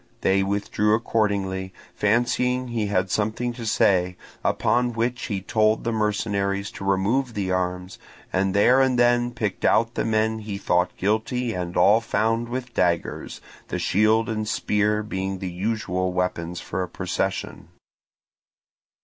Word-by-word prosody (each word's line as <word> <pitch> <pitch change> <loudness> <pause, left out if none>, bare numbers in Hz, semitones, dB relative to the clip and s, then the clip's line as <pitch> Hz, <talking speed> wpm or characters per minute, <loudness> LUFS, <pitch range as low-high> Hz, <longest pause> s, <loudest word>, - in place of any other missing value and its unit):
They 95 +1 +3
withdrew 100 +2 +1
accordingly, 100 -4 -1 0.2
fancying 125 +3 +1
he 115 -3 -1
had 95 -2 0
something 110 +3 -1
to 115 -1 -6
say; 90 -4 +2 0.3
upon 120 0 +1
which 120 +2 -1
he 100 -4 -2
told 110 +2 +1
the 115 - -1
mercenaries 105 -2 -1
to - - -9
remove 105 +6 +1
the 95 -3 -1
arms, 90 0 -2 0.3
and 95 0 +1
there 125 +6 +5
and 130 -2 +2
then 120 0 +3
picked 105 -5 -4
out 115 +1 +3
the - - -1
men 110 0 +1
he 105 -2 -5
thought 90 -2 0
guilty 110 +4 0
and 90 -2 -4
all 110 +3 +5
found 115 +1 0
with 125 0 -5
daggers, 85 -1 -1 0.3
the - - -3
shield 110 +3 +2
and 110 -1 -2
spear 105 0 +1
being 95 -2 -3
the 95 -1 -5
usual 95 -1 -1
weapons 90 -1 -2
for 95 - -4
a 90 - -3
procession. - - -3
105 Hz, 145 wpm, -24 LUFS, 95-115 Hz, 0.3 s, there